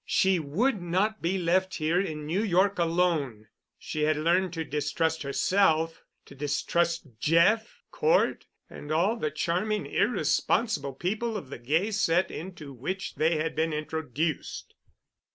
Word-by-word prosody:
She 190 Hz, -2 st, +3 dB
would 190 Hz, -, 0 dB
not 190 Hz, +6 st, 0 dB
be 175 Hz, +3 st, 0 dB
left 185 Hz, +2 st, +1 dB
here 165 Hz, +3 st, +1 dB
in 155 Hz, -6 st, -4 dB
New 170 Hz, +7 st, 0 dB
York 195 Hz, -1 st, +2 dB
alone. 165 Hz, -10 st, 0 dB, 0.3 s
She 155 Hz, -, -5 dB
had 155 Hz, 0 st, +2 dB
learned 175 Hz, +4 st, +2 dB
to 165 Hz, -1 st, -2 dB
distrust 160 Hz, +2 st, -1 dB
herself, 160 Hz, +2 st, +1 dB, 0.2 s
to -, -, -14 dB
distrust 160 Hz, +4 st, 0 dB
Jeff, 170 Hz, -, +2 dB
Cort, 470 Hz, +2 st, +1 dB, 0.2 s
and 145 Hz, -, -9 dB
all 180 Hz, +8 st, +2 dB
the 155 Hz, -10 st, -2 dB
charming 180 Hz, +8 st, -1 dB
irresponsible 150 Hz, -, +1 dB
people 215 Hz, -, -2 dB
of 140 Hz, -9 st, -9 dB
the -, -, -6 dB
gay 160 Hz, -, 0 dB
set 180 Hz, -3 st, +2 dB
into 160 Hz, -5 st, -8 dB
which 185 Hz, +10 st, -4 dB
they 160 Hz, +2 st, +1 dB
had 155 Hz, +1 st, -2 dB
been 160 Hz, +1 st, 0 dB
introduced. 155 Hz, 0 st, -3 dB
170 Hz, 140 wpm, -28 LUFS, 155-190 Hz, 0.3 s, She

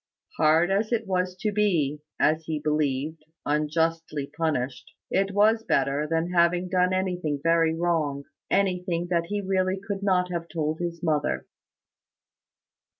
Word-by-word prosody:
Hard 160 Hz, +4 st, +4 dB
as 210 Hz, +3 st, +1 dB
it 230 Hz, -2 st, 0 dB
was 185 Hz, -1 st, -1 dB
to 215 Hz, -, 0 dB
be, 170 Hz, -9 st, +1 dB, 0.2 s
as 155 Hz, +1 st, +2 dB
he 155 Hz, -1 st, -2 dB
believed, 150 Hz, 0 st, -1 dB, 0.2 s
unjustly 155 Hz, -1 st, -1 dB
punished, 145 Hz, -5 st, -2 dB, 0.2 s
it 195 Hz, +1 st, +2 dB
was 215 Hz, +3 st, +3 dB
better 140 Hz, -3 st, +1 dB
than 165 Hz, +2 st, 0 dB
having 175 Hz, +1 st, +2 dB
done 180 Hz, 0 st, +2 dB
anything 180 Hz, -6 st, -1 dB
very 165 Hz, -1 st, +3 dB
wrong 160 Hz, -5 st, 0 dB, 0.3 s
anything 180 Hz, -3 st, 0 dB
that 170 Hz, -1 st, +1 dB
he 205 Hz, +2 st, -2 dB
really 190 Hz, 0 st, 0 dB
could 200 Hz, 0 st, -5 dB
not 180 Hz, -2 st, +1 dB
have 170 Hz, -1 st, -3 dB
told 155 Hz, -1 st, -2 dB
his 170 Hz, -1 st, -4 dB
mother. 150 Hz, -3 st, 0 dB
170 Hz, 140 wpm, -26 LUFS, 155-185 Hz, 0.3 s, Hard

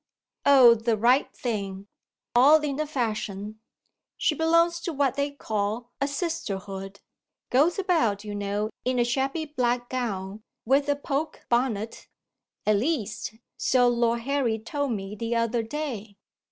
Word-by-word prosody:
"Oh, 260 Hz, -4 st, +8 dB
the 225 Hz, 0 st, 0 dB
right 245 Hz, +6 st, +3 dB
thing 200 Hz, -5 st, -4 dB, 0.5 s
all 290 Hz, +6 st, +7 dB
in 280 Hz, -2 st, -2 dB
the 305 Hz, 0 st, -1 dB
fashion. 215 Hz, -5 st, -3 dB, 0.6 s
She -, -, +2 dB
belongs 335 Hz, +2 st, +3 dB
to 345 Hz, -, -4 dB
what 275 Hz, -3 st, +1 dB
they 280 Hz, 0 st, -1 dB
call 225 Hz, -3 st, -3 dB
a 275 Hz, -, +2 dB
Sisterhood; 200 Hz, -, -4 dB, 0.5 s
goes 295 Hz, +7 st, +3 dB
about, 320 Hz, -, +1 dB
you 210 Hz, -1 st, -6 dB
know, 205 Hz, +1 st, -2 dB
in 255 Hz, 0 st, 0 dB
a 240 Hz, -, +4 dB
shabby 270 Hz, +6 st, -1 dB
black 245 Hz, -4 st, -1 dB
gown, 205 Hz, -5 st, -3 dB, 0.2 s
with 275 Hz, +4 st, +3 dB
a 285 Hz, -, +3 dB
poke 285 Hz, +2 st, -3 dB
bonnet. 230 Hz, -3 st, -1 dB, 0.6 s
At 215 Hz, -1 st, +4 dB
least, 220 Hz, -5 st, -2 dB, 0.2 s
so 250 Hz, -1 st, +3 dB
Lord 235 Hz, -1 st, +1 dB
Harry 260 Hz, -3 st, 0 dB
told 280 Hz, +5 st, -3 dB
me 195 Hz, -1 st, -5 dB
the 230 Hz, +2 st, -2 dB
other 230 Hz, 0 st, +1 dB
day." 225 Hz, -5 st, -5 dB
240 Hz, 140 wpm, -26 LUFS, 215-285 Hz, 0.6 s, Oh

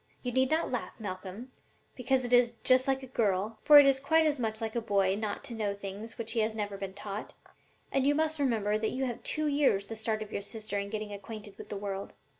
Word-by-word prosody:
You 250 Hz, -, -2 dB
need 260 Hz, +1 st, +2 dB
not 320 Hz, +1 st, +1 dB
laugh, 250 Hz, -, -3 dB
Malcolm, 195 Hz, +4 st, -6 dB, 0.4 s
because 255 Hz, 0 st, +1 dB
it 245 Hz, -, -2 dB
is 245 Hz, -1 st, +5 dB
'just 255 Hz, 0 st, +4 dB
like 270 Hz, 0 st, +1 dB
a -, -, -5 dB
girl,' 215 Hz, -3 st, 0 dB
for 300 Hz, -1 st, +9 dB
it 290 Hz, -, +10 dB
is 270 Hz, -1 st, +4 dB
quite 320 Hz, +4 st, +3 dB
as 295 Hz, -3 st, +1 dB
much 220 Hz, -2 st, -2 dB
like 225 Hz, 0 st, -4 dB
a 235 Hz, -, +1 dB
boy 200 Hz, -3 st, +2 dB
not 210 Hz, -1 st, -3 dB
to -, -, -6 dB
know 210 Hz, -3 st, -1 dB
things 200 Hz, +3 st, -7 dB
which 230 Hz, -1 st, -4 dB
he 235 Hz, -, 0 dB
has 220 Hz, 0 st, +1 dB
never 205 Hz, -2 st, -3 dB
been 195 Hz, -1 st, -6 dB
taught, 205 Hz, +1 st, -6 dB, 0.6 s
and 270 Hz, 0 st, +2 dB
you 290 Hz, -, +4 dB
must 315 Hz, 0 st, 0 dB
remember 215 Hz, -6 st, +1 dB
that 220 Hz, -, 0 dB
you 265 Hz, +1 st, -1 dB
have 240 Hz, -2 st, -4 dB
two 310 Hz, 0 st, -1 dB
years 280 Hz, -9 st, +2 dB
the 225 Hz, -, -7 dB
start 220 Hz, 0 st, -2 dB
of 210 Hz, -, -13 dB
your -, -, -3 dB
sister 210 Hz, -1 st, -4 dB
in 200 Hz, 0 st, -4 dB
getting 215 Hz, -1 st, -4 dB
acquainted 205 Hz, 0 st, -8 dB
with -, -, -11 dB
the 205 Hz, -, -4 dB
world. 195 Hz, -1 st, -5 dB
225 Hz, 245 wpm, -30 LUFS, 205-260 Hz, 0.6 s, it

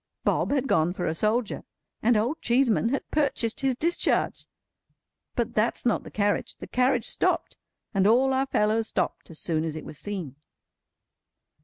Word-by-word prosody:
Bob -, -, +1 dB
had 275 Hz, -1 st, +1 dB
gone 160 Hz, -4 st, +2 dB
for 180 Hz, -1 st, -3 dB
a 160 Hz, -, 0 dB
soldier, 215 Hz, +5 st, 0 dB, 0.4 s
and 230 Hz, 0 st, +4 dB
Old 240 Hz, +9 st, -1 dB
Cheeseman 240 Hz, -2 st, +2 dB
had 275 Hz, -, -2 dB
purchased 270 Hz, -6 st, 0 dB
his 270 Hz, -2 st, +1 dB
discharge. 335 Hz, +7 st, 0 dB, 0.9 s
But 235 Hz, -2 st, -1 dB
that's 220 Hz, +2 st, 0 dB
not 240 Hz, -, +2 dB
the -, -, -9 dB
carriage. 205 Hz, -1 st, 0 dB
The -, -, -9 dB
carriage 250 Hz, -1 st, +1 dB
stopped, -, -, 0 dB, 0.4 s
and 195 Hz, -1 st, +3 dB
all 260 Hz, +4 st, +4 dB
our 265 Hz, +1 st, +1 dB
fellows 220 Hz, -2 st, +1 dB
stopped 185 Hz, -, -2 dB
as 160 Hz, -, -7 dB
soon 160 Hz, -2 st, 0 dB
as 160 Hz, -1 st, -3 dB
it 155 Hz, -, -7 dB
was 150 Hz, -, -8 dB
seen. 180 Hz, -10 st, -5 dB
225 Hz, 165 wpm, -26 LUFS, 195-255 Hz, 0.9 s, and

